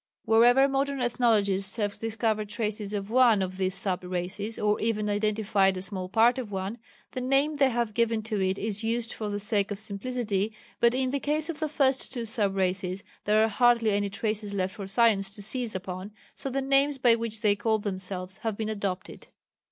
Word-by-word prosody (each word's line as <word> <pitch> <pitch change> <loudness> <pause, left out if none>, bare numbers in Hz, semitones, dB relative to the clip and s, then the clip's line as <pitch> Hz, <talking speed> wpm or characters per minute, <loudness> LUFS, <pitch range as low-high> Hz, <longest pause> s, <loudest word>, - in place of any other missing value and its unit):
Wherever 245 +4 +5
modern 275 0 -1
ethnologists 210 -6 +2
have 205 -3 -2
discovered 220 -2 -1
traces 210 -1 -2
of 200 +1 -4
one 235 -5 +5
of 185 0 -5
these 190 0 0
sub 190 -1 0
races, 185 +4 -4
or 210 0 +1
even 215 -2 -1
identified 205 -2 +1
a - - -4
small 190 -2 -4
part 235 +5 +4
of 230 -5 -6
one, 195 +4 -4 0.3
the 255 - -4
name 275 +4 +2
they 280 -2 +3
have 235 -3 -1
given 230 0 +1
to 215 -2 -2
it 190 +1 0
is 210 +1 -2
used 230 +1 -1
for 215 -2 -4
the 205 - -2
sake 205 0 0
of 205 - -4
simplicity, 215 0 -2 0.3
but 235 +1 +4
in 260 0 0
the 280 - -1
case 300 +3 -1
of 315 -3 -4
the 310 -2 -1
first 275 -3 +1
two 240 -3 -4
sub 210 -4 +1
races 185 0 -1 0.2
there 215 +1 +4
are - - +3
hardly 230 0 +3
any 205 0 0
traces 210 0 -3
left 190 -1 -1
for 200 -3 -7
science 200 -2 +3
to 200 +1 -9
seize 230 +1 -1
upon, 185 +2 -6 0.2
so 275 - -5
the 270 +1 -2
names 275 +1 +2
by 245 -3 +5
which 230 -1 -3
they 210 -2 +3
called 220 0 0
themselves 185 -1 -4
have 220 -3 -3
been 220 -1 -3
adopted. 200 -3 -4
215 Hz, 200 wpm, -27 LUFS, 200-240 Hz, 0.3 s, Wherever